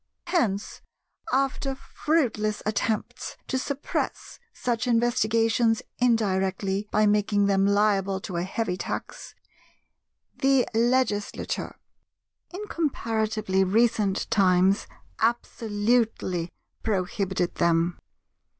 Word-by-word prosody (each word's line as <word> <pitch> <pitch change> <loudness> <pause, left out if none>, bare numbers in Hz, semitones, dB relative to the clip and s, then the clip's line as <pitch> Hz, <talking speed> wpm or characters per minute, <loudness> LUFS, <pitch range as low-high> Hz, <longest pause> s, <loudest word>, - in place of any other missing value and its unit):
Hence, 210 - -1 0.5
after 270 0 0
fruitless 250 -8 -1
attempts 215 0 -2
to 260 - -1
suppress 280 +1 -3
such 240 - -2
investigations 230 -1 +2 0.2
indirectly 195 -4 +1
by 215 +1 +3
making 205 -1 +2
them 195 0 +3
liable 200 -2 +2
to 180 -3 -5
a - - 0
heavy 185 0 -2
tax, - - -6 1.0
the 270 -2 +3
Legislature, 230 -3 0 0.7
in 390 +4 -6
comparatively 220 - 0
recent 210 0 +2
times, 190 0 +3 0.3
absolutely 220 -5 0 0.3
prohibited 190 -3 -1
them. 170 0 +2
215 Hz, 85 wpm, -26 LUFS, 195-240 Hz, 1.0 s, by